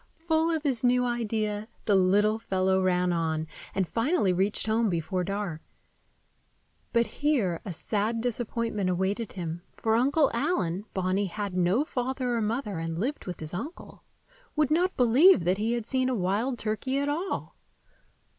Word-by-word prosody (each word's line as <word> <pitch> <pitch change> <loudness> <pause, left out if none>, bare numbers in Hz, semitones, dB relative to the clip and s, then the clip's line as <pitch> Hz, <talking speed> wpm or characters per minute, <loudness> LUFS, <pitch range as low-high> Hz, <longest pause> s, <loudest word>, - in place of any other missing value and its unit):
Full 325 0 +1
of 320 -2 -1
his 260 -6 0
new 250 0 +3
idea, 220 -3 -1 0.2
the 210 - +3
little 205 +3 +3
fellow 190 -2 +1
ran 180 -1 +2
on, 160 -2 -1 0.3
and 190 -2 +1
finally 230 - +1
reached 195 +3 0
home 220 0 +2
before 180 +1 -1
dark. 195 -4 -3 1.3
But 235 0 +3
here 240 - 0
a 195 - -4
sad 215 +6 -1
disappointment 230 -4 -1
awaited 190 +5 -1
him, 170 -2 -5 0.2
for 220 - +1
Uncle 275 +5 +3
Allen—Bonny 195 - -1
had 200 +1 -4
no 185 +10 +2
father 255 -2 -2
or 230 - 0
mother, 215 -4 -2
and 165 0 -3
lived 255 - -3
with 180 - -5
his 155 +1 -6
uncle—would 310 - -5
not 360 +4 +2
believe 250 - +6
that 180 +3 +1
he 225 +3 0
had 235 -2 -2
seen 260 +1 0
a 255 - 0
wild 215 +6 0
turkey 225 +5 -2
at 285 +1 0
all. 330 +7 -3
220 Hz, 155 wpm, -28 LUFS, 185-255 Hz, 1.3 s, believe